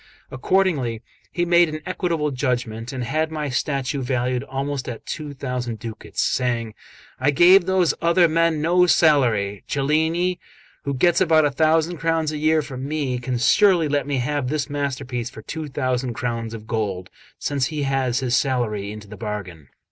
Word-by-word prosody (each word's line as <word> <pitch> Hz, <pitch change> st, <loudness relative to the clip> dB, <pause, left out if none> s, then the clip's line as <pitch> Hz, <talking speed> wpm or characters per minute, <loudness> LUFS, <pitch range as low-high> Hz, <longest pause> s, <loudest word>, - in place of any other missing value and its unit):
Accordingly 130 Hz, -, 0 dB, 0.3 s
he 175 Hz, -1 st, 0 dB
made 175 Hz, -1 st, +4 dB
an 155 Hz, 0 st, -5 dB
equitable 170 Hz, -5 st, -1 dB
judgment, 120 Hz, -3 st, -2 dB
and 130 Hz, -2 st, -4 dB
had 155 Hz, +6 st, -1 dB
my 150 Hz, -2 st, -3 dB
statue 135 Hz, +1 st, -1 dB
valued 125 Hz, 0 st, -1 dB
also 135 Hz, -1 st, -4 dB
at 115 Hz, -, -14 dB
two 150 Hz, -2 st, -6 dB
thousand 125 Hz, -3 st, -4 dB
ducats, 110 Hz, 0 st, -4 dB
saying: 120 Hz, -3 st, -1 dB, 0.5 s
"I 135 Hz, +2 st, +2 dB
gave 175 Hz, +6 st, +6 dB
those 185 Hz, -3 st, +3 dB
other 170 Hz, +1 st, +4 dB
men 165 Hz, -1 st, +1 dB
no 180 Hz, +2 st, +4 dB
salary; 120 Hz, -, +3 dB
Cellini, 160 Hz, +6 st, +1 dB, 0.5 s
who 140 Hz, -1 st, -1 dB
gets 175 Hz, +7 st, +3 dB
about 160 Hz, -4 st, +4 dB
a 145 Hz, -, +1 dB
thousand 160 Hz, +3 st, +2 dB
crowns 165 Hz, -1 st, 0 dB
a 150 Hz, -, -4 dB
year 155 Hz, 0 st, +2 dB
from 130 Hz, -1 st, -6 dB
me, 140 Hz, -5 st, -2 dB
can 125 Hz, 0 st, -2 dB
surely 170 Hz, -, +4 dB
let 145 Hz, -2 st, 0 dB
me 140 Hz, -2 st, -1 dB
have 140 Hz, +1 st, -1 dB
this 150 Hz, 0 st, -2 dB
masterpiece 135 Hz, -4 st, -3 dB
for 110 Hz, -, -12 dB
two 160 Hz, -1 st, -5 dB
thousand 130 Hz, -3 st, -2 dB
crowns 115 Hz, -2 st, -3 dB
of 110 Hz, -1 st, -10 dB
gold, 100 Hz, -5 st, -3 dB, 0.3 s
since 140 Hz, -3 st, -1 dB
he 150 Hz, -2 st, -3 dB
has 135 Hz, -2 st, 0 dB
his 125 Hz, -1 st, +1 dB
salary 110 Hz, -8 st, 0 dB
into 105 Hz, -1 st, -9 dB
the 105 Hz, +1 st, -10 dB
bargain." 95 Hz, -, -6 dB
140 Hz, 170 wpm, -22 LUFS, 120-155 Hz, 0.5 s, gave